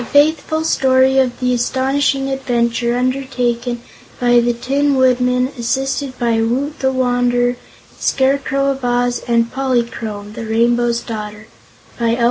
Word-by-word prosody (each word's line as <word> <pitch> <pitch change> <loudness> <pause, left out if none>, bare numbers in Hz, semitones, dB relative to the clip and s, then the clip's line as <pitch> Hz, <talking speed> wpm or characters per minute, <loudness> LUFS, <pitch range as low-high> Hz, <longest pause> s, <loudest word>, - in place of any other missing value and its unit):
Frank 235 - -7
Baum 285 - +7
A - - +5
Faithful 315 0 -4
Story 265 -3 +3
of 250 -2 0
the 250 -1 +1
Astonishing 270 +3 0
Adventure 240 -2 0
Undertaken 250 -2 -1 0.4
by 245 -1 +4
the 240 0 +2
Tin 275 +4 0
Woodman, 250 -1 +2
assisted 265 +2 -2
by 230 -2 +1
Woot 270 +7 -1
the 265 0 +1
Wanderer, 245 -1 +1
the 245 - -17
Scarecrow 275 0 +1
of 270 -1 -6
Oz, 245 0 0
and 235 -1 +1
Polychrome, 230 -5 -2
the 225 0 -6
Rainbow's 235 +1 +1
Daughter 210 -2 -7 0.5
by 230 0 +1
L. - - -6
245 Hz, 145 wpm, -17 LUFS, 235-265 Hz, 0.5 s, Baum